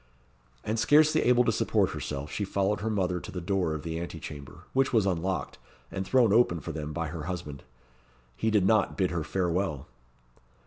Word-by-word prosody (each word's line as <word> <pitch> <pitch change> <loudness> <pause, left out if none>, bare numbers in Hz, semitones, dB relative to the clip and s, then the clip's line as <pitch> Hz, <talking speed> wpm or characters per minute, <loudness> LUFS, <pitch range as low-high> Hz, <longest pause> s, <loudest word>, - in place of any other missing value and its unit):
And 110 +1 -1
scarcely 155 +4 +5
able 125 0 +4
to 115 - +2
support 110 - +1
herself, 75 +1 -5
she 105 - -2
followed 100 +1 0
her 110 - -1
mother 90 -4 0
to - - -9
the 90 - -4
door 90 -3 0
of 75 - -6
the 80 0 -3
ante 85 -1 -6
chamber, 70 -3 -9
which 135 0 +2
was 110 -5 +3
unlocked, 95 0 -2 0.3
and 95 -1 -4
thrown 120 -6 +4
open 110 -7 +4
for 85 - -6
them 75 -1 -5
by 80 0 -3
her 80 -1 -6
husband. 85 -6 -5 0.7
He 110 - 0
did 105 -4 +3
not 105 -1 +2
bid 95 -4 +1
her 85 -2 -2
farewell! 90 -5 -1
95 Hz, 190 wpm, -28 LUFS, 80-110 Hz, 0.7 s, scarcely